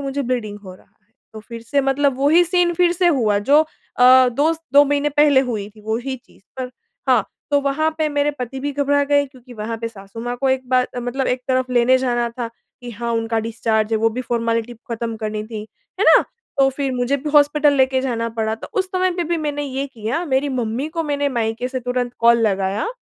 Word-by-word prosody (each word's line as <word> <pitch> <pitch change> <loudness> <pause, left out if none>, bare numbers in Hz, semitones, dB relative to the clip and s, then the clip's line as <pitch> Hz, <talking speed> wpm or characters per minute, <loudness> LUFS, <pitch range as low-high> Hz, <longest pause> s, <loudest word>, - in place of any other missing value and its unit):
मुझे 280 0 -3
ब्लीडिंग 235 -5 -3
हो 185 -1 -9
रहा - - -21
है। 190 - -41 0.3
तो 215 - -7
फ़िर 230 +1 -10
से 280 +5 0
मतलब 270 0 +1
वो 275 +2 +2
ही 345 +3 +6
सीन 350 0 +2
फ़िर 350 0 +3
से 355 +1 +1
हुआ 225 -10 +2
जो 280 +9 +4 0.4
अ, 255 0 +7
दोस 300 +7 +1
2 285 +1 +7
महीने 290 +1 +1
पहले 295 -2 +4
हुई 220 -6 -3
थी 215 0 -18
वो 220 +1 -1
ही 260 +2 -4
चीज़। 240 - -23 0.2
पर 255 -1 -4 0.4
हाँ, 245 -6 +4 0.3
तो 285 -1 +3
वहाँ 280 +3 0
पे 310 -1 +1
मेरे 290 0 +1
पति 250 +1 -5
भी 290 +2 -2
घबरा 285 0 +1
गए 285 0 +3
क्योंकि 255 -2 -16
वहाँ 225 +1 -4
पे 230 - -2
सासू-माँ 225 +3 -7
को 270 +2 0
एक 260 -1 -1
बार 255 -1 +3
मतलब 255 +2 -2
एक 250 - 0
तरफ़ 255 -1 0
लेने 245 +1 +4
जाना 240 -2 0
था 235 0 -5
कि 240 +1 -14
हाँ 235 +1 -3
उनका 225 0 -1
डिस्चार्ज 220 -1 -1
है। 220 - +2
वो 225 +1 +2
भी - - -1
फॉर्मेलिटी 230 -1 -1 0.2
ख़त्म 230 0 -3
करनी 215 -1 -4
थी। 220 -1 -6 0.4
है - - +3
ना? - - +8 0.4
तो 270 0 +5
फ़िर 275 0 -3
मुझे 250 +3 0
भी 290 +2 -5
हॉस्पिटल 295 0 +4
लेके 265 -1 +2
जाना 230 -3 -2
पड़ा। 220 0 0
तो 225 - -10
उस 375 - -2
समय 370 0 +1
पे 350 - -1
भी 340 +1 -1
मैंने 290 -2 -2
ये 275 0 -3
किया 250 +5 -3
मेरी 270 0 +1
मम्मी 235 +6 -2
को 330 - +1
मैंने 285 -2 -1
मायके 235 -1 -2
से 255 0 -4
तुरंत 250 0 -2
कॉल 235 0 +5
लगाया। 195 +1 -1
255 Hz, 225 wpm, -20 LUFS, 230-285 Hz, 0.4 s, ना